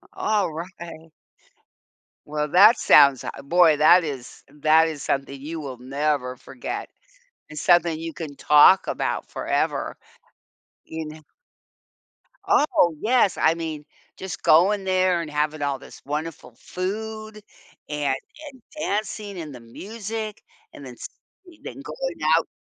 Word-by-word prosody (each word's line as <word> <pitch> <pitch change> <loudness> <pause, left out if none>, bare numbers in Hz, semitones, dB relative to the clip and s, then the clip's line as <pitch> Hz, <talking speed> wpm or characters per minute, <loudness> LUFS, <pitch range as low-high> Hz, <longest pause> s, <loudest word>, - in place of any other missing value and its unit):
Alright. 170 -4 -3 1.1
Well, 150 0 -2
that 210 +7 +7
sounds 140 -2 +5
a 140 - -7
boy, 165 0 +4
that 170 +4 +6
is 135 -4 -7
that 155 +3 +3
is 150 -3 -6
something 135 0 -2
you 160 +2 -6
will 135 -4 -7
never 135 0 -2
forget. 130 -2 -7 0.6
It's 155 -1 -7
something 175 -2 +3
you 165 -1 -6
can 155 -4 -7
talk 150 +7 +6
about - - -3
forever. - - -2 0.9
You 160 -1 -6
kn 155 0 -12 1.2
Oh, 175 - +3
yes, 230 -5 +2
I 160 - +3
mean 160 -3 -6 0.3
just 190 -1 -7
going 195 +5 +4
there 185 -2 +1
and 155 -3 -7
having 150 +1 -1
all 140 -2 -1
this - - -14
wonderful 150 -3 -5
food, 215 +3 -5 0.5
and 145 -3 -1 0.4
and 260 - -19 0.2
dancing, 210 - -3
and 150 -5 -7
the - - -10
music, 215 - -7 0.3
and 140 - -11
then 125 - -9
s - - -8 0.6
then - - -8
going - - -5 0.2
out - - -1
160 Hz, 130 wpm, -23 LUFS, 145-190 Hz, 1.2 s, that